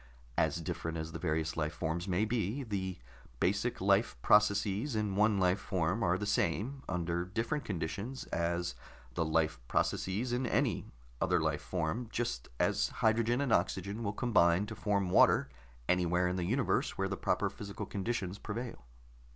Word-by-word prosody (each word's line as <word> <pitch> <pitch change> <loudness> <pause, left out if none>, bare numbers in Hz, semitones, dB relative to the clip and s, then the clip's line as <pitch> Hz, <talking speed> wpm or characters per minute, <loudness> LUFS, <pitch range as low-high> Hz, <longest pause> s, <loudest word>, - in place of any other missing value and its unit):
"As 80 +1 +1
different 80 +1 -3
as 80 0 -4
the 80 - -6
various 80 -1 -1
life 75 -1 -2
forms 85 +3 -2
may 95 +3 +2
be, 115 +3 -1
the 95 -5 -3 0.4
basic - - +1
life - - +2
processes 105 +4 +3
in 105 -3 0
one 105 0 +4
life 90 +1 +3
form 95 +2 -1
are 90 -2 +2
the 105 - -3
same, 105 - 0
under 85 -1 -1
different 115 +10 -2
conditions, 100 +8 -4
as 85 -3 0 0.4
the 85 - 0
life 80 -2 +1
processes 110 - 0
in 125 +1 0
any - - +1 0.3
other - - +3
life - - 0
form, 90 +7 -2
just 60 - -2
as - - +2 0.2
hydrogen 115 +3 +3
and 130 -5 +1
oxygen 100 +4 0
will 100 -3 -1
combine 100 -5 +3
to 110 +1 -7
form 100 -4 0
water - - +5 0.4
anywhere 90 0 +2
in 90 - -1
the 90 -2 -1
universe 125 +6 +1
where 95 - +1
the 95 - -2
proper - - 0
physical 100 -1 -6
conditions 100 -2 -3
prevail." 115 - -5
95 Hz, 160 wpm, -33 LUFS, 85-110 Hz, 0.4 s, water